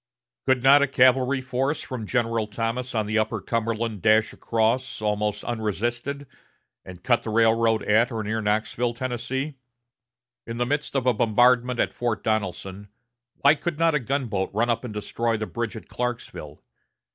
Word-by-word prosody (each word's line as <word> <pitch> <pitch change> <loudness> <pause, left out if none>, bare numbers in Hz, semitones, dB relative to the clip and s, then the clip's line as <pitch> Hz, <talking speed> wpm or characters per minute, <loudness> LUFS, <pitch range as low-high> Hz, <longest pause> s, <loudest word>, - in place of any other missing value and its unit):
Could 130 -2 +2
not 140 +2 +7
a 140 - +3
cavalry 130 0 +3
force 130 +3 -2
from 120 -5 -6
General 115 -2 0
Thomas 115 +4 -3
on 110 -1 +1
the 110 +1 +1
upper 110 0 -1
Cumberland 115 -1 -2
dash 110 0 +3
across, 115 +3 0
almost 105 0 -1
unresisted, 120 +5 -3 0.6
and 90 -1 -12
cut 120 -2 +2
the - - -6
railroad 115 0 +3
at 115 +4 +3
or 110 -2 -3
near 110 +2 -2
Knoxville, 110 +3 -1
Tennessee? 130 +3 -4 0.9
In 115 0 -5
the 120 - +1
midst 145 +2 -2
of 135 -2 0
a 125 - +4
bombardment 120 +3 +3
at - - +1
Fort 120 -2 -2
Donelson, 100 -2 -3 0.5
why 140 - +7
could 155 +1 -4
not 165 0 +3
a 150 - +2
gunboat 120 -7 -2
run 115 +3 +2
up 115 +1 -2
and 125 - -5
destroy 115 +2 -2
the 110 - -3
bridge 115 0 -4
at 110 - -9
Clarksville? 120 -11 -5
115 Hz, 165 wpm, -25 LUFS, 110-125 Hz, 0.9 s, not